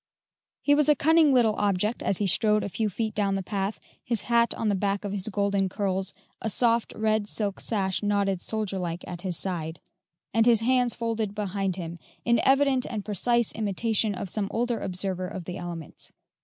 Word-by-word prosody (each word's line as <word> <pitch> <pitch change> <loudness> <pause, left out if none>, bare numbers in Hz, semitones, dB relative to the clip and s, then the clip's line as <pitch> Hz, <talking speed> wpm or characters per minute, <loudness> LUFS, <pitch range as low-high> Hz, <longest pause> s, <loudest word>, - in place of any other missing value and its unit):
He 290 - +4
was 300 0 +3
a 300 - +6
cunning 315 +1 +4
little 240 -4 +4
object 205 +3 0
as 195 - +2
he 205 - +1
strode 210 +3 +3
a - - -3
few 215 +2 -1
feet 220 +2 -3
down 200 -2 0
the 195 - -2
path, 200 +1 -3 0.2
his 235 -4 +1
hat 235 -1 +2
on 225 - -2
the 205 - +2
back 200 +1 -1
of 200 - -3
his 200 0 -2
golden 200 -2 +1
curls, 190 -1 -2 0.3
a 220 - -1
soft, 230 +2 +1
red 215 -1 +1
silk 205 -3 -1
sash 190 -4 -1
knotted 200 -3 0
soldier 215 -3 -2
like 175 -1 -4
at 175 -1 -7
his 180 -3 -2
side, 165 -4 -2 0.5
and 225 +1 +3
his 230 -2 +6
hands 250 0 +2
folded 225 -3 -2
behind 195 -2 -2
him, 170 -2 -6 0.3
in 235 -1 +3
evident 270 0 +3
and 215 -4 -4
precise 235 +3 +1
imitation 215 0 0
of 190 - -4
some 200 +2 -2
older 240 0 -1
observer 185 0 -2
of 180 -2 -7
the 180 +2 -5
elements. 170 -3 -7
205 Hz, 195 wpm, -26 LUFS, 190-230 Hz, 0.5 s, a